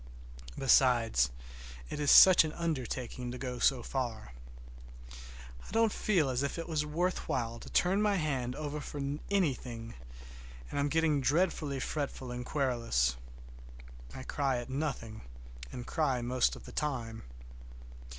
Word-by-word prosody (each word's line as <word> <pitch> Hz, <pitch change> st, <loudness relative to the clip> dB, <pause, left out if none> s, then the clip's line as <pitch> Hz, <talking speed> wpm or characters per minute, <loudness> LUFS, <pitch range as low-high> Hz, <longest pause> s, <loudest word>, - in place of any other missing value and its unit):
Besides, 120 Hz, -, +4 dB, 0.6 s
it -, -, -4 dB
is 145 Hz, -1 st, +1 dB
such 185 Hz, -3 st, +9 dB
an 155 Hz, -1 st, -4 dB
undertaking 130 Hz, -6 st, -3 dB
to 125 Hz, -, -6 dB
go 125 Hz, -1 st, -5 dB
so 125 Hz, -1 st, +3 dB
far. 115 Hz, -, -4 dB, 0.8 s
I -, -, -13 dB
don't 225 Hz, +1 st, +3 dB
feel 165 Hz, -10 st, +1 dB
as 125 Hz, 0 st, -1 dB
if 140 Hz, +3 st, -2 dB
it 165 Hz, -, -5 dB
was 155 Hz, -3 st, 0 dB
worth 170 Hz, +5 st, -2 dB
while 115 Hz, -1 st, -2 dB
to -, -, -10 dB
turn 190 Hz, +3 st, +2 dB
my 210 Hz, -1 st, +2 dB
hand 135 Hz, -7 st, -1 dB
over 150 Hz, 0 st, -4 dB
for 145 Hz, -, -7 dB, 0.3 s
anything, 125 Hz, -, -1 dB, 0.8 s
and -, -, -2 dB
I'm 145 Hz, +1 st, +1 dB
getting 160 Hz, -2 st, +2 dB
dreadfully 150 Hz, -1 st, +1 dB
fretful 135 Hz, -3 st, -4 dB
and 125 Hz, 0 st, -4 dB
querulous. 120 Hz, -, 0 dB, 1.0 s
I 130 Hz, -, -7 dB
cry 135 Hz, -1 st, -1 dB
at 120 Hz, +2 st, -6 dB
nothing, 130 Hz, -6 st, -3 dB, 0.5 s
and 120 Hz, -, -7 dB
cry 135 Hz, -4 st, 0 dB
most 125 Hz, +1 st, +1 dB
of -, -, -12 dB
the -, -, -10 dB
time. 120 Hz, -7 st, -3 dB
135 Hz, 140 wpm, -31 LUFS, 120-155 Hz, 1.0 s, such